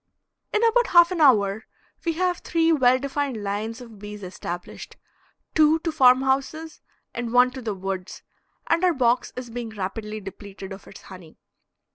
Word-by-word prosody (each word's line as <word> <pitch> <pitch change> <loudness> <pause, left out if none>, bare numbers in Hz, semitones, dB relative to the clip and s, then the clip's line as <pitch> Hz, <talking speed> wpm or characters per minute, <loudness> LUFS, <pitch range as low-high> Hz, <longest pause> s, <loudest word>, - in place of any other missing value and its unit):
In 425 - +1
about 475 +1 +3
half 345 0 +6
an 350 -3 -1
hour 215 -6 +3 0.4
we 335 - +1
have 360 +1 0
three 330 -1 +1
well 255 -4 +4
defined 275 -4 -3
lines 210 +4 -4
of 230 -4 -12
bees 210 0 -9
established 175 -1 -7 0.6
two 310 0 +5
to 330 - -2
farm 260 -3 +5
houses 275 +4 -2 0.3
and 235 -1 -4
one 250 +1 +5
to 260 0 -8
the 220 -4 -3
woods, 190 -1 -6 0.4
and 335 - +1
our 360 -3 +3
box 245 -1 +1
is 250 -2 -7
being 235 -1 -5
rapidly 215 +1 -5
depleted 195 0 -9
of 195 - -12
its - - -13
honey. 180 -4 -13
245 Hz, 165 wpm, -24 LUFS, 205-310 Hz, 0.6 s, half